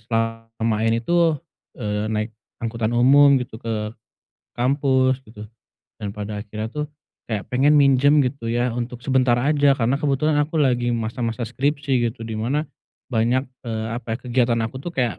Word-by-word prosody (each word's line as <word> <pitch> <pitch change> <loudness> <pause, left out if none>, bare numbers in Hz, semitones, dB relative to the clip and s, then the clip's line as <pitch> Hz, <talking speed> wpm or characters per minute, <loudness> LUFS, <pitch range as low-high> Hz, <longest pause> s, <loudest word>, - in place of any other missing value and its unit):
selama 115 0 -2
ini 115 +1 0
tuh, 170 -3 +3 0.4
eee, 105 -2 -2
naik 110 0 -2 0.2
angkutan 115 0 -2
umum 140 +3 +6
gitu, 120 -3 -4
ke, 110 -2 -2 0.7
kampus 130 0 +1
gitu. 105 -1 -11 0.5
Dan 100 -1 -5
pada 105 0 -4
akhirnya 110 +1 -6
tuh, 150 0 -2 0.4
kayak 105 -4 -2
pengen 145 +4 +4
minjem 140 +1 +5
gitu 125 -3 -3
ya, 120 +1 0
untuk 120 +1 -5
sebentar 130 -3 +3
aja, 145 +1 +3
karena 125 +3 +1
kebetulan 150 +1 +2
aku 155 +2 -1
lagi 125 -5 +2
masa-masa 115 +1 -3
skripsi 135 0 0
gitu, 115 0 -8
di 110 - -5
mana, 145 +7 0 0.5
banyak, 120 +3 +2 0.2
eee, 110 -1 -3
apa 115 -1 -4
ya, - - -2
kegiatan 120 -1 +1
aku 115 +4 -4
tuh 170 +5 -7
kayak, 125 -6 0
120 Hz, 160 wpm, -22 LUFS, 115-135 Hz, 0.7 s, umum